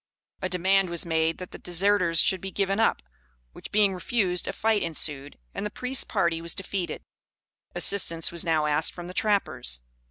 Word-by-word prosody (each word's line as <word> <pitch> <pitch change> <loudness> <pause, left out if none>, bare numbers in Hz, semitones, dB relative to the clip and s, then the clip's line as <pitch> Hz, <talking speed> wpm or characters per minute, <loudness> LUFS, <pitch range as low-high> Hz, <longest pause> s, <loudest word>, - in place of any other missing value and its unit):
A 185 - -2
demand 190 +1 +2
was 170 0 +1
made 160 0 0
that 185 - -9
the - - -10
deserters 180 -1 +2
should 190 -2 +1
be 195 - -5
given 195 +1 -1
up, 65 - +2 0.5
which - - -11
being 205 -2 +3
refused, 180 -2 -1
a - - -1
fight 220 -1 +1
ensued, 145 -4 0 0.2
and - - -4
the 210 - -2
priest's 250 +4 -1
party 170 -1 0
was 170 0 -1
defeated. 195 -2 -4 0.7
Assistance 165 -5 +2
was 170 -1 -1
now 160 -3 +1
asked 150 +1 +1
from 175 - -8
the 180 - -8
trappers. 190 - 0
180 Hz, 180 wpm, -26 LUFS, 165-200 Hz, 0.7 s, being